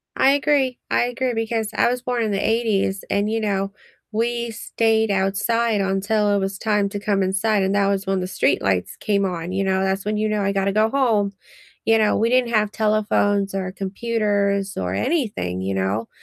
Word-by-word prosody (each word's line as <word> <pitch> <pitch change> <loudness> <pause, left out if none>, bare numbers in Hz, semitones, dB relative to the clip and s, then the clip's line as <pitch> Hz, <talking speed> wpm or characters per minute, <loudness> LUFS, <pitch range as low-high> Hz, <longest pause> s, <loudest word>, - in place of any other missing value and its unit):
I 270 - +4
agree, 280 -3 +1
I - - +2
agree 245 +1 -1
because 225 -1 -1
I 235 - +3
was 250 0 -2
born 245 -2 -1
in 215 - -1
the 195 - 0
'80s, 215 -4 0
and, 205 +1 +1
you 225 0 0
know, 195 -2 -1 0.4
we 235 +1 -1
stayed 220 0 0
outside 205 +3 +1
until 205 +2 +1
it 200 - +2
was 195 0 -3
time 210 -2 0
to 205 0 -5
come 200 -1 0
inside, 195 +2 +1
and 190 +1 0
that 200 -1 +3
was 200 0 0
when 195 -1 +1
the 180 - -2
streetlights 95 - 0
came 200 -2 +1
on, 175 -1 -4
you 195 +1 -1
know, 190 0 +1
that's 190 +1 -1
when 210 0 -1
you 215 0 0
know, 210 -1 0
"I 200 0 +1
gotta 195 0 +1
go 215 +2 +2
home," 220 -7 +1 0.5
you 225 0 +4
know, 215 -1 +2
we 230 +2 +2
didn't 250 -1 +2
have 210 -1 +2
telephones 205 -2 +1
or 185 -1 -3
computers 200 -1 -1
or 90 0 -2
anything, 150 - -1
you 95 +1 -2
know? 95 +4 -1
205 Hz, 200 wpm, -22 LUFS, 195-225 Hz, 0.5 s, I